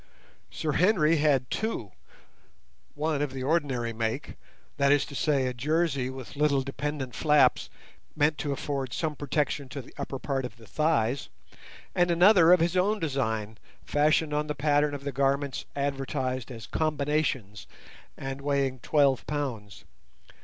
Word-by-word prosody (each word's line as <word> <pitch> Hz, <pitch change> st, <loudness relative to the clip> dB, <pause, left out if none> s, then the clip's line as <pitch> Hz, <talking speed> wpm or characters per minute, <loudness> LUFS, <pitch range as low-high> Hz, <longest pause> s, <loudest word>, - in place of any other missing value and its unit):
Sir 155 Hz, -, -2 dB
Henry 165 Hz, -1 st, +3 dB
had 145 Hz, -4 st, +2 dB
two, 195 Hz, -, -2 dB, 1.0 s
one 150 Hz, -1 st, -1 dB
of 145 Hz, -3 st, -2 dB
the 130 Hz, -1 st, -4 dB
ordinary 135 Hz, -6 st, 0 dB
make, 110 Hz, 0 st, -3 dB, 0.5 s
viz. 140 Hz, -1 st, +2 dB
a 135 Hz, -4 st, +2 dB
jersey 140 Hz, 0 st, 0 dB
with 130 Hz, 0 st, -9 dB
little 140 Hz, -2 st, +2 dB
dependent 135 Hz, -1 st, -4 dB
flaps 150 Hz, -5 st, +3 dB, 0.5 s
meant 150 Hz, 0 st, +2 dB
to 145 Hz, -, -2 dB
afford 135 Hz, -2 st, -3 dB
some 155 Hz, -2 st, -2 dB
protection 145 Hz, -1 st, -1 dB
to 135 Hz, -, -6 dB
the 130 Hz, -, -11 dB
upper 140 Hz, -1 st, -4 dB
part 135 Hz, 0 st, -2 dB
of 120 Hz, -3 st, -7 dB
the 115 Hz, -, -15 dB
thighs, 140 Hz, -3 st, 0 dB, 0.6 s
and 175 Hz, 0 st, +2 dB
another 175 Hz, 0 st, +6 dB
of 180 Hz, -2 st, +6 dB
his 170 Hz, +2 st, +1 dB
own 200 Hz, +4 st, +2 dB
design 110 Hz, -, -2 dB, 0.3 s
fashioned 150 Hz, +1 st, +2 dB
on 150 Hz, +1 st, 0 dB
the 150 Hz, -, -3 dB
pattern 145 Hz, 0 st, +2 dB
of 140 Hz, -, -8 dB
the 140 Hz, -, -3 dB
garments 140 Hz, +1 st, 0 dB
advertised 135 Hz, -3 st, -2 dB
as 115 Hz, -4 st, -8 dB
"combinations" 145 Hz, -9 st, -1 dB, 0.5 s
and 135 Hz, 0 st, -5 dB
weighing 140 Hz, -2 st, 0 dB
twelve 140 Hz, -1 st, +2 dB
pounds. 125 Hz, -9 st, -4 dB
140 Hz, 140 wpm, -28 LUFS, 130-150 Hz, 1.0 s, another